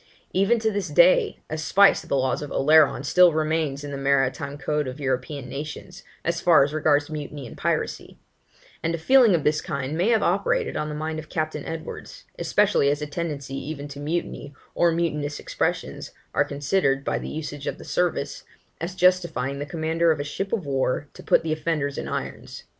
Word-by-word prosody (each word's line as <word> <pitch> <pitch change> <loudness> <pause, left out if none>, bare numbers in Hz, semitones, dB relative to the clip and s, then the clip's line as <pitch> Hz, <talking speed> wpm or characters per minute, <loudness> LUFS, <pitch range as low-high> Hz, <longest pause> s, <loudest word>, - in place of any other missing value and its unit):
Even 195 +5 +3
to 220 -1 0
this 205 -1 -2
day, - - +4
a 155 - -4
spice 195 +5 +5
of - - -15
the 140 - +2
laws 130 0 0
of 145 - -5
Oleron 150 -2 +4
still 180 +5 +5
remains 155 -2 -1
in 145 - -6
the 140 - -4
maritime 140 +1 0
code 150 0 -1
of 130 +3 -6
European 135 0 -2
nations, 150 +7 -7 0.2
as 170 0 0
far 165 -5 +6
as 145 +2 -2
regards 150 -1 +2
mutiny 145 -2 -6
and 115 - -10
piracy; - - -2 0.6
and 165 +1 0
a - - -4
feeling 235 +3 +5
of 160 - -1
this 150 +1 +2
kind 140 -1 -3
may 180 +7 +1
have 225 -2 +3
operated - - +1
on 150 - -2
the 150 - -5
mind 155 +1 -3
of 155 - -10
Captain 155 -2 -2
Edwards, 165 - -7 0.2
especially 205 -9 +3
as 145 +1 -1
a - - -1
tendency 145 -3 -5
even 145 +1 -5
to 140 0 -9
mutiny, 145 -2 -4 0.2
or 170 -1 +3
mutinous 150 -3 -1
expressions, - - -3 0.2
are - - +3
considered, 140 -1 0
by - - 0
the - - -6
usage 145 -2 -6
of - - -3
the - - -12
service, - - -1 0.4
as 175 +3 -4
justifying 175 -7 +2
the 145 - -4
commander 165 +1 +1
of 155 - -1
a - - -1
ship 195 +7 -4
of 210 -8 -1
war 135 +1 -1
to - - -11
put - - +3
the 160 -1 0
offenders 155 -3 -2
in - - -5
irons. - - -6
155 Hz, 195 wpm, -24 LUFS, 140-170 Hz, 0.6 s, far